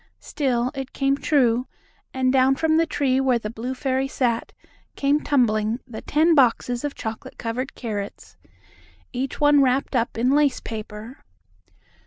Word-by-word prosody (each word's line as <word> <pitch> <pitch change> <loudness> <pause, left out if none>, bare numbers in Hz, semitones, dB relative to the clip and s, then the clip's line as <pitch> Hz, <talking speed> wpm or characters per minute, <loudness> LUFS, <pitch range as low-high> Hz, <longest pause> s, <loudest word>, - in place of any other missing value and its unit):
Still, 255 -3 -1
it 270 -2 -6
came 275 0 +1
true, 255 -5 +2 0.4
and 260 0 +1
down 265 0 +4
from 315 +2 +2
the 330 0 +2
tree 265 -4 +1
where 260 -2 +2
the 215 -2 -5
blue 245 +3 -5
fairy 265 0 -1
sat, 240 -4 -1 0.4
came 285 +1 +2
tumbling 225 -6 +1
the 240 -4 -8
ten 320 +3 +3
boxes 245 -3 +2
of 290 -1 -3
chocolate 220 0 -7
covered 250 +4 -4
carrots, 205 - -6 0.8
each 260 +2 -3
one 290 -1 +5
wrapped 265 +1 +1
up 235 -2 0
in 245 +3 +2
lace 290 -1 +3
paper. 220 +2 -8
260 Hz, 150 wpm, -23 LUFS, 230-275 Hz, 0.8 s, one